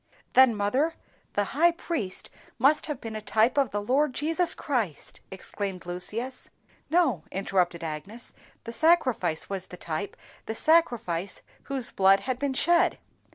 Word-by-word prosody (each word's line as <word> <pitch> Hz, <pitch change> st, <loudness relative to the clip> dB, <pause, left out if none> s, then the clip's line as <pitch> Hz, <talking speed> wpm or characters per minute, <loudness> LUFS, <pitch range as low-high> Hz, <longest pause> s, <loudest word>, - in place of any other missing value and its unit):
_" -, -, -39 dB
"Then, 260 Hz, -3 st, +6 dB
mother, 260 Hz, +11 st, +1 dB, 0.4 s
the 205 Hz, -, +1 dB
high 315 Hz, -, +3 dB
priest 325 Hz, -, -4 dB, 0.3 s
must 275 Hz, +7 st, +3 dB
have 295 Hz, -4 st, -4 dB
been 225 Hz, -3 st, -7 dB
a 215 Hz, -, -4 dB
TYPE 220 Hz, +3 st, +2 dB
of 270 Hz, -4 st, +2 dB
the 205 Hz, 0 st, -3 dB
Lord 265 Hz, +4 st, +1 dB
Jesus 330 Hz, +3 st, +2 dB
Christ!" 225 Hz, -, -3 dB
exclaimed 190 Hz, -1 st, -5 dB
Lucius. 210 Hz, +9 st, -3 dB, 0.4 s
"No," 310 Hz, -, +2 dB
interrupted 180 Hz, -3 st, 0 dB
Agnes, 165 Hz, +10 st, -6 dB, 0.3 s
"the 230 Hz, -, -7 dB
sacrifice 255 Hz, -, +2 dB
was 195 Hz, -2 st, -5 dB
the 180 Hz, -, -10 dB
type, 170 Hz, +5 st, -5 dB, 0.3 s
the 220 Hz, -, -3 dB
sacrifice 230 Hz, -, +1 dB, 0.2 s
whose 270 Hz, -4 st, -3 dB
blood 195 Hz, 0 st, +4 dB
had 255 Hz, -1 st, -3 dB
been 280 Hz, -1 st, -1 dB
shed." 345 Hz, +4 st, +3 dB
230 Hz, 150 wpm, -27 LUFS, 195-285 Hz, 0.4 s, Then